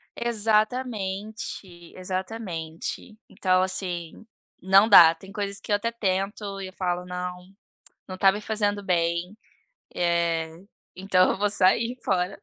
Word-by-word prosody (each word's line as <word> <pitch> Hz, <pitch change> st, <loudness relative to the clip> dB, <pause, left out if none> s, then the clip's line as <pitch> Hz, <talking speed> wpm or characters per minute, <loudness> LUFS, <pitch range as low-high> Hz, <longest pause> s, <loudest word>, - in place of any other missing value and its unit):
Exatamente, 215 Hz, -5 st, -2 dB
exatamente, 185 Hz, -1 st, -5 dB
então, 185 Hz, -2 st, +1 dB
assim, 180 Hz, -1 st, -2 dB, 0.4 s
não 195 Hz, +3 st, +5 dB
dá! 165 Hz, -6 st, +8 dB
Tem 190 Hz, +4 st, -14 dB
coisas 200 Hz, -1 st, -4 dB
que -, -, -8 dB
eu -, -, +5 dB
até 230 Hz, +3 st, -2 dB
tento 195 Hz, -1 st, -3 dB
e 190 Hz, -, -5 dB
eu 185 Hz, -, -12 dB
falo: 180 Hz, -1 st, -2 dB
"Não, 180 Hz, 0 st, -5 dB, 0.7 s
não 185 Hz, -, -6 dB
tá 195 Hz, +1 st, +5 dB
me 205 Hz, -, -5 dB
fazendo 205 Hz, -1 st, -1 dB
bem". 175 Hz, +1 st, -1 dB, 0.6 s
Eh, 170 Hz, -2 st, 0 dB, 0.4 s
então 185 Hz, -1 st, +3 dB
eu -, -, -2 dB
vou 205 Hz, +1 st, +1 dB
sair 205 Hz, +5 st, +2 dB
fora 185 Hz, -1 st, -1 dB
190 Hz, 130 wpm, -25 LUFS, 180-205 Hz, 0.7 s, dá